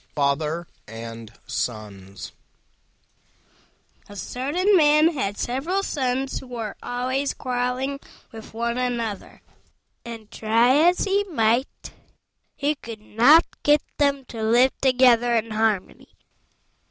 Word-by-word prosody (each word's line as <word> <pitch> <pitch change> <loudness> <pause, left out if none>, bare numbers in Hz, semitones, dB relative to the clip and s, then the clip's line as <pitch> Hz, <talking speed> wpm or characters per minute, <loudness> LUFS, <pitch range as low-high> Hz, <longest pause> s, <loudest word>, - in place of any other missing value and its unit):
FATHER 150 +4 0 0.2
AND 115 0 -9
SONS 100 -4 -5 1.8
A 205 - -11
certain 290 - 0
man 305 0 +5
had 205 -8 -3
several 320 +11 -2
Sons 265 -4 -2
who 265 - -13
were 230 -4 -6
always 260 +3 -2
quarrelling 255 +2 -2 0.3
with 220 -1 -11
one 235 +2 -2
another, 235 -5 -4 0.6
and, 230 -3 -9
try 240 +8 +3
as 360 - -1
he 400 +1 +1
might, 240 - -1 0.6
he 290 +1 0
could 230 -6 -10
not 245 +10 +5 0.2
get 295 0 +3 0.2
them 280 -2 +1
to 230 -2 -8
live 240 +4 +4
together 245 -2 +4
in 225 0 -1
harmony. 215 -3 -1
245 Hz, 110 wpm, -23 LUFS, 215-275 Hz, 1.8 s, man